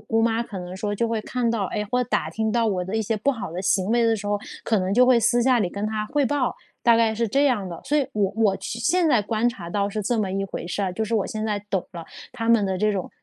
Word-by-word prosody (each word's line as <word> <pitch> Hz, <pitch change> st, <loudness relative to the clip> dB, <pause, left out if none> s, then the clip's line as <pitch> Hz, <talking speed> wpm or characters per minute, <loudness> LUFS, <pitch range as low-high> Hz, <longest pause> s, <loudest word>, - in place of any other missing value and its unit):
姑 225 Hz, +1 st, 0 dB
妈 230 Hz, 0 st, +2 dB
可 215 Hz, -5 st, -7 dB
能 180 Hz, 0 st, -7 dB
说 205 Hz, +1 st, -2 dB
就 230 Hz, +3 st, 0 dB
会 225 Hz, -1 st, -1 dB
看 245 Hz, 0 st, -1 dB
到， 225 Hz, -4 st, 0 dB
哎， 210 Hz, +3 st, -3 dB
或 250 Hz, 0 st, +2 dB
打 -, -, -1 dB
听 220 Hz, 0 st, -1 dB
到 235 Hz, 0 st, +2 dB
我 185 Hz, -4 st, 0 dB
的 190 Hz, -, -5 dB
一 -, -, +1 dB
些 220 Hz, +1 st, -1 dB
不 220 Hz, +7 st, +1 dB
好 230 Hz, -10 st, -5 dB
的 175 Hz, -, -4 dB
行 190 Hz, -1 st, +2 dB
为 235 Hz, 0 st, +3 dB
的 225 Hz, 0 st, +3 dB
时 205 Hz, -1 st, -7 dB
候， 205 Hz, 0 st, 0 dB, 0.3 s
可 220 Hz, -3 st, +2 dB
能 185 Hz, +1 st, -1 dB
就 250 Hz, +4 st, +5 dB
会 255 Hz, -2 st, +6 dB
私 230 Hz, +2 st, +3 dB
下 255 Hz, 0 st, +4 dB
里 190 Hz, -, +1 dB
跟 200 Hz, +3 st, -3 dB
她 215 Hz, 0 st, -2 dB
汇 290 Hz, +2 st, +1 dB
报。 265 Hz, -2 st, 0 dB, 0.3 s
大 235 Hz, -1 st, +5 dB
概 225 Hz, -1 st, +2 dB
是 230 Hz, +1 st, 0 dB
这 275 Hz, +7 st, +2 dB
样 240 Hz, -9 st, +1 dB
的， 170 Hz, -2 st, -7 dB
所 295 Hz, -, +1 dB
以 290 Hz, -, +3 dB
我 200 Hz, -2 st, 0 dB
我 210 Hz, -4 st, +3 dB
现 230 Hz, -, -5 dB, 0.2 s
现 330 Hz, -, +3 dB
在 245 Hz, -8 st, +3 dB
观 220 Hz, +3 st, +1 dB
察 175 Hz, -8 st, -7 dB
到 200 Hz, +2 st, 0 dB
是 210 Hz, +1 st, -3 dB
这 230 Hz, +3 st, 0 dB
么 200 Hz, -3 st, 0 dB
一 195 Hz, 0 st, -1 dB
回 190 Hz, -3 st, -6 dB
事 190 Hz, +3 st, -2 dB
儿， 185 Hz, -2 st, -1 dB
就 220 Hz, -, -2 dB
是 225 Hz, +2 st, -2 dB
我 210 Hz, -4 st, +2 dB
现 215 Hz, 0 st, -4 dB
在 210 Hz, -2 st, -1 dB
懂 190 Hz, -3 st, -1 dB
了 170 Hz, -1 st, -7 dB, 0.3 s
她 225 Hz, -2 st, -4 dB
们 230 Hz, -4 st, +4 dB
的 190 Hz, -1 st, -1 dB
这 210 Hz, +3 st, +2 dB
种， 195 Hz, -3 st, -3 dB
215 Hz, 325 characters per minute, -24 LUFS, 195-235 Hz, 0.3 s, 会